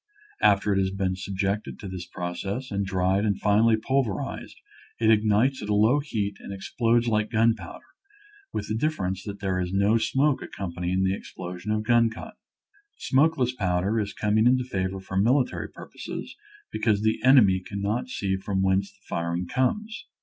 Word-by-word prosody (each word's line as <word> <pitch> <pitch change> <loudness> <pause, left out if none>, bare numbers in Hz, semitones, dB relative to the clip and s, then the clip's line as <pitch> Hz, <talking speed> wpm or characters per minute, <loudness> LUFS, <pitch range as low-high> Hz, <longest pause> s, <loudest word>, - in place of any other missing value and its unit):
After 100 +1 +4
it 95 - +2
has 95 -1 +1
been 95 -1 -1
subjected 95 +2 -3
to 100 - -8
this 90 -1 -6
process 95 +8 -5
and 100 0 -1
dried 95 0 +1
and 100 -3 0
finely 110 +2 +4
pulverized 125 -3 -2 0.4
it 110 -1 +4
ignites 110 +5 +3
at 105 - -6
a 105 - +2
low 110 +7 +4
heat 105 -8 -3
and - - -9
explodes 115 +4 0
like 110 -2 +1
gunpowder, 110 -5 0 0.7
with - - -4
the - - -2
difference 105 - -1
that 100 0 -7
there 95 -2 0
is 90 0 -2
no 100 +4 +3
smoke 135 +5 +1
accompanying 90 0 -3
the 95 0 +2
ex - - -11
plosion 90 +2 -6
of 110 0 0
gun 115 0 +4
cotton. 215 - -9 0.6
Smokeless 135 -2 +2
powder 95 0 0
is 100 -1 -2
coming 110 +2 +2
into 125 0 +3
favor 95 -5 -3
for 95 0 -5
military 125 +7 +1
purposes - - -8 0.4
be - - -4
cause 110 -2 +2
the 110 0 +1
enemy 120 -8 +6
cannot 100 +6 -3
see 95 -6 -1
from 95 0 -1
whence 95 +1 +1
the - - -31
firing 85 +1 -2
comes. 210 - -1
105 Hz, 170 wpm, -26 LUFS, 95-115 Hz, 0.7 s, enemy